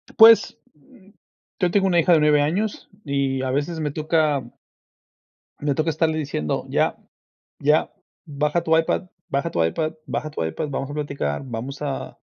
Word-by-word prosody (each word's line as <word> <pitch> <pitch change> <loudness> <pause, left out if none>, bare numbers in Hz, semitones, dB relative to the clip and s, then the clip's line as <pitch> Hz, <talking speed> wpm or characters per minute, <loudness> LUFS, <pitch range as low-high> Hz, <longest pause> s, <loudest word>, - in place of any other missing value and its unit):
Pues, 225 -5 +7 0.2
mm, 170 +7 -22 0.5
yo 180 -2 +2
tengo 195 0 +3
una 175 -2 +3
hija 170 +1 +4
de 160 - +5
9 150 -1 +4
años 195 +9 -1 0.2
y 140 -2 -1
a 130 -1 -1
veces 145 +5 -2
me 150 -2 -2
toca 155 -1 +1 1.2
me 145 -1 0
toca 155 +3 0
estarle 160 0 +1
diciendo: 135 - -2
"Ya, - - +1 0.6
ya, - - +2 0.3
baja 150 +3 0
tu 160 -1 +3
iPad, 165 +3 0 0.2
baja 140 +4 -1
tu 85 - +1
iPad, 155 - -1
baja 155 - -3
tu 145 - -4
iPad, 80 - -3
vamos 135 0 -3
a - - -6
platicar, 140 - -3
vamos 130 +4 -6
a 140 -2 -4
150 Hz, 165 wpm, -23 LUFS, 140-165 Hz, 1.2 s, Pues